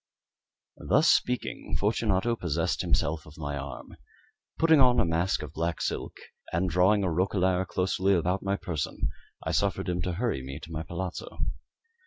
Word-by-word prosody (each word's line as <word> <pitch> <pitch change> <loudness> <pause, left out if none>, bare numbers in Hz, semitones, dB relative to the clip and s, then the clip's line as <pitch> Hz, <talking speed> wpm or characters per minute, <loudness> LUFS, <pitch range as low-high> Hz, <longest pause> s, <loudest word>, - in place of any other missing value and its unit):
Thus - - +5
speaking, 125 0 0
Fortunato 105 +1 +1
possessed 85 -5 -1
himself 75 +1 0
of 75 - -14
my 75 -2 -3
arm. 70 -1 -7 0.6
Putting 160 -2 +5
on 125 -1 +5
a - - +4
mask 85 +3 0
of - - -8
black 85 +1 -1
silk, - - -3 0.3
and 90 +2 0
drawing 95 +4 +4
a 90 - +1
roquelaire 95 +1 +1
closely 95 +2 +1
about 90 +3 +1
my 100 0 0
person, 90 -6 -2 0.4
I - - 0
suffered - - 0
him 90 0 -1
to 90 - -1
hurry 110 - -1
me 70 +3 -7
to 80 - -10
my 80 -1 -3
palazzo. 85 +2 -5
90 Hz, 160 wpm, -28 LUFS, 80-100 Hz, 0.6 s, Thus